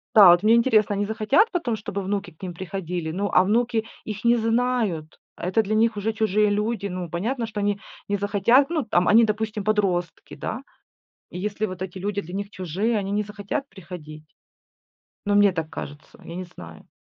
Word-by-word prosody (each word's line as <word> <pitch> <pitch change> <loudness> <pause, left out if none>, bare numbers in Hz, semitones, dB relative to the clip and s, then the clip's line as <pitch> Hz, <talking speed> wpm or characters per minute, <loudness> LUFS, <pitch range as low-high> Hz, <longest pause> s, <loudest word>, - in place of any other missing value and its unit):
Да, 205 -4 +10
вот 175 +2 +4
мне 220 +2 +6
интересно, 220 -4 +3
они 205 +1 0
захотят 225 - +2
потом, 295 - -1
чтобы 200 -2 -5
внуки 195 -2 -3
к 155 - -26
ним 180 -2 -5
приходили? 180 -2 -4
Ну, 200 +4 -2
а 185 - +6
внуки 225 +2 +1 0.2
их 210 -1 -6
не 235 0 +4
знают. 225 -8 0 0.2
Это 185 +6 +1
для 215 0 -1
них 220 0 +2
уже 215 +2 -1
чужие 215 -1 +2
люди. 210 0 -1
Ну, 180 -2 -5
понятно, 230 +9 -2
что 215 -2 -5
они 205 0 0 0.3
не 205 - 0
захотят. 205 +7 +3
Ну, 325 -4 0
там, 180 -4 +2
они, 230 +2 +7
допустим, 215 -1 -2
подростки, 185 -6 -1
да. 235 +5 -5 0.7
И 180 - -7
если 210 +2 -2
вот 185 -2 -7
эти 190 0 -5
люди 200 +2 -2
для 175 +1 -9
них 200 +1 -4
чужие, 195 +5 -1
они 195 -1 -3
не 210 +1 +1
захотят 210 +7 -5
приходить. 160 -5 -10 1.0
Ну, 205 - +1
мне 205 -1 +6
так 160 -2 -4
кажется, 145 +2 -9
я 170 - -8
не 185 - -4
знаю. 85 - -12
205 Hz, 195 wpm, -24 LUFS, 185-220 Hz, 1.0 s, Да